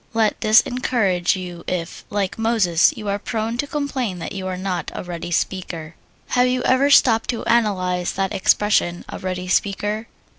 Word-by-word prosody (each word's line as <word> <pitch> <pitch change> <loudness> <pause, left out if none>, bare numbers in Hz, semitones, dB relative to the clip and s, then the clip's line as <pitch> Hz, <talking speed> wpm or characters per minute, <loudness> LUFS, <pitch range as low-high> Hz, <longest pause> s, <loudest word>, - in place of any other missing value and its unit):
Let 220 -2 +1
this 215 +1 +6
encourage 215 -9 0
you 175 -2 -7
if, 170 -2 -4
like 200 0 -2
Moses, 210 -7 +3
you 210 - -6
are 200 0 -1
prone 225 +2 -3
to 285 - 0
complain 270 -9 -2
that 170 - -6
you 190 -1 -5
are 185 -1 -3
not 185 -1 -3
a - - -4
ready 175 -1 -6
speaker. 170 -2 -3 0.4
Have 250 0 +3
you 250 0 0
ever 265 +2 +3
stopped 230 -5 +5
to 235 - -2
analyze 185 -6 +1
that 195 0 -1
expression, 190 -3 +2
"a - - -6
ready 185 -1 -4
speaker?" 205 +4 0
200 Hz, 175 wpm, -21 LUFS, 180-230 Hz, 0.4 s, this